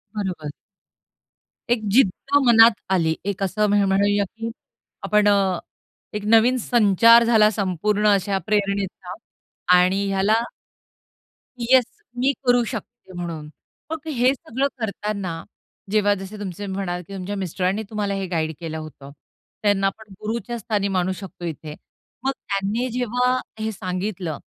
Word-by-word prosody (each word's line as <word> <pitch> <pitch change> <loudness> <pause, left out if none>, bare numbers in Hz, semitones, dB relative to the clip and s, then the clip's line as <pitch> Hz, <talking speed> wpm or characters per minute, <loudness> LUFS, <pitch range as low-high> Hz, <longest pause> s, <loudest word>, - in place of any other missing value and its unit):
बरोबर. 185 -7 -3 1.2
एक 240 -2 +2
जिद्द 270 +5 +3
मनात 230 0 +8 0.2
आली. 165 -4 +2
एक 200 -1 -2
असं 210 +3 +1
म्हण 205 0 +3
म्हणूया 200 +1 +2
की 225 +4 -6 0.5
आपण 210 0 +3
अ, 195 -3 +3 0.5
एक 210 -1 -4
नवीन 225 +4 +5
संचार 230 0 +5
झाला 220 -2 +5
संपूर्ण 205 +1 0
अशा 200 0 0
प्रेरणेचा 200 -3 -1 0.6
आणि 185 +3 +2
ह्याला 195 +3 +2 1.2
येस. 250 +1 +4 0.3
मी 265 +3 +3
करू 245 -1 +4
शकते 235 -3 -8
म्हणून. 165 -4 -6 0.4
मग 320 -1 -5
हे 250 +2 +3
सगळं 265 +1 -2
करताना, 200 -5 -4 0.5
जेव्हा 205 -1 +3
जसे 195 +2 -8
तुमचे 205 0 -5
म्हणाल 190 -2 -3
की 200 - -10
तुमच्या 195 +2 -4
मिस्टरांनी 190 +2 -1
तुम्हाला 210 -2 -2
हे 195 -1 -2
गाईड 160 -3 -1
केलं 160 -2 -5
होतं. 145 -3 -10 0.5
त्यांना 200 -2 +3
आपण 210 +1 -7
गुरुच्या 235 +2 -3
स्थानी 210 -2 -1
मानू 185 0 +1
शकतो 190 -3 -9
इथे. 155 -2 -6 0.5
मग 270 - +1
त्यांनी 205 0 -2
जेव्हा 250 +1 +1 0.2
हे 220 0 -2
सांगितलं, 185 -4 -4
205 Hz, 130 wpm, -22 LUFS, 185-225 Hz, 1.2 s, मनात